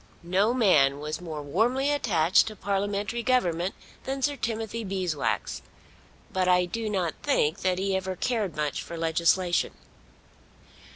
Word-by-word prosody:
No 190 +6 +2
man 150 - +4
was 150 +3 -4
more 155 -4 -6
warmly 240 - +1
attached 190 - +3
to 215 - -6
parliamentary 205 +3 -2
government 185 -8 +1 0.3
than 270 0 -3
Sir 290 +1 +2
Timothy 225 -2 -3
Beeswax; 185 -6 -2 0.7
but 185 -1 +1
I 180 0 +4
do 220 +5 -3
not 185 -5 -1
think 165 - +1
that 185 -1 0
he 195 0 0
ever 190 0 -2
cared 215 -5 -1
much 150 -1 -2
for 170 - -7
legislation. 170 +2 +1
190 Hz, 135 wpm, -27 LUFS, 170-225 Hz, 0.7 s, man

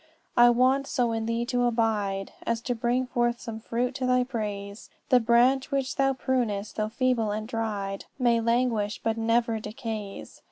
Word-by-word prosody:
"'I 240 0 +7
want 260 +3 +3
so 240 -2 0
in 225 0 -2
thee 230 +1 -1
to 245 0 +1
abide 215 -5 0
As 230 0 -1
to 245 - -1
bring 240 +2 0
forth 240 -1 0
some 220 -1 -6
fruit 240 +3 -2
to 255 -1 -2
thy 250 0 +3
praise; 210 -4 -5 0.2
The 250 - +6
branch 245 +4 +3
which 275 -2 -1
thou 270 0 +2
prunest, 235 -6 -1
though 215 0 0
feeble 240 -2 +1
and 215 +1 -3
dried, 210 -4 -3
May 240 -3 +3
languish, 230 -3 +1
but 225 -1 +1
never 230 0 +1
decays. 215 -1 -6
235 Hz, 170 wpm, -27 LUFS, 220-250 Hz, 0.2 s, I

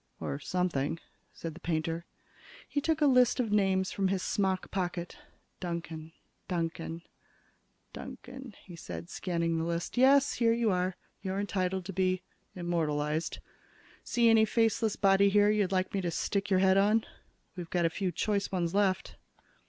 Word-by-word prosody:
"Or 140 - -3
something," 165 -3 -1 0.3
said 165 -1 -6
the 170 - -12
painter. 165 0 -2 0.6
He 285 - -1
took 320 +1 0
a - - +6
list 250 -2 +4
of 230 -4 0
names 190 -2 +2
from 195 -1 0
his 185 -1 -1
smock 190 -2 -1
pocket. 175 -2 -3 0.4
"Duncan, 165 -2 -5 0.4
Duncan, 165 -1 -3 0.9
Duncan," 265 -5 -9
he 175 - -10
said, 85 - -8
scanning 170 -2 -1
the - - -1
list. 170 +6 -3
"Yes 275 +2 +5
here 230 -1 +3
you 230 -2 +2
are. 180 0 0 0.3
You're 190 0 -2
entitled 190 -2 -1
to 195 - -5
be 185 0 +1 0.3
immortalized. 160 -3 -1 0.7
See 235 -1 +2
any 225 -1 +6
faceless 220 -1 +2
body 200 0 +4
here 205 +1 +4
you'd 205 -3 +1
like 185 -1 0
me 195 - 0
to 175 - -1
stick 200 +4 -1
your 190 -1 +3
head 190 0 +5
on? 215 +3 +3 0.5
We've 175 -3 -7
got 175 -2 +1
a 165 - +2
few 185 +1 -1
choice 200 +4 -1
ones 175 -2 -1
left." 195 -2 +1
185 Hz, 160 wpm, -30 LUFS, 170-205 Hz, 0.9 s, a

